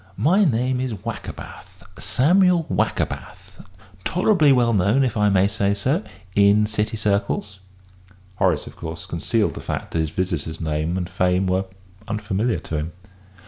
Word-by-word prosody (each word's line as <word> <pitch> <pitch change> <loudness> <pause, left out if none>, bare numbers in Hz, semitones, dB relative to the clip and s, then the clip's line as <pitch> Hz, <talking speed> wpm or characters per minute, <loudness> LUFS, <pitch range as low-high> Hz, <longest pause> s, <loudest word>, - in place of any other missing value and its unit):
My 170 - +4
name 125 - +1
is 130 -4 -2
Wackerbath, 105 -1 -8 0.2
Samuel 175 +4 +3
Wackerbath - - -3 0.4
tolerably 180 - +3
well 120 -3 +3
known, 105 +7 +3
if 125 -4 -1
I 105 -1 +3
may 95 0 +4
say 100 -1 0
so, 135 - 0 0.3
in 100 +1 +5
City 105 +1 -1
circles." 100 -1 -1 0.8
Horace, 90 -7 +1
of - - -11
course, 80 +2 -7
concealed 100 +5 0
the - - -7
fact - - -4
that 85 - -1
his 80 -1 0
visitor's 80 -2 -3
name 80 +2 -1
and 90 -2 -2
fame 90 +1 +1
were 95 +1 0 0.4
unfamiliar 110 +1 -1
to 80 - -4
him. 80 +2 -4
105 Hz, 145 wpm, -22 LUFS, 90-125 Hz, 0.8 s, in